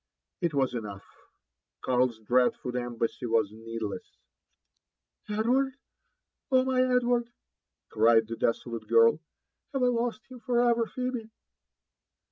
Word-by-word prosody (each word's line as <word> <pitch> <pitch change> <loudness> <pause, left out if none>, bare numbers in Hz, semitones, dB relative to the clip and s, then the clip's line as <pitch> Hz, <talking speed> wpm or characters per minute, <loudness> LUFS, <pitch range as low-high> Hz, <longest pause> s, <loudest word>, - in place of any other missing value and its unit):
It 170 -5 -1
was 135 -3 +1
enough, 105 -4 -6 0.4
— - - -60
Karl's 125 -2 +1
dreadful 125 +2 +1
embassy 120 0 -3
was 110 -3 +1
needless;—^ 110 -1 -6 0.5
' - - -53
* - - -34
Edward 250 +6 +1 0.7
1 260 -2 +5
oh, - - -2
my 260 -1 +2
Edward! 245 -2 +2 0.3
" - - -61
cried 115 0 +4
the 115 - -4
desolate 115 -1 -2
girl, 115 +4 +5 0.3
" - - -50
have 270 -2 0
I 250 - +4
lost 235 -2 -1
him 255 -1 -11
for 240 0 0
ever, 235 -1 +2
Phebe 250 -3 -4
130 Hz, 140 wpm, -28 LUFS, -, 0.7 s, 1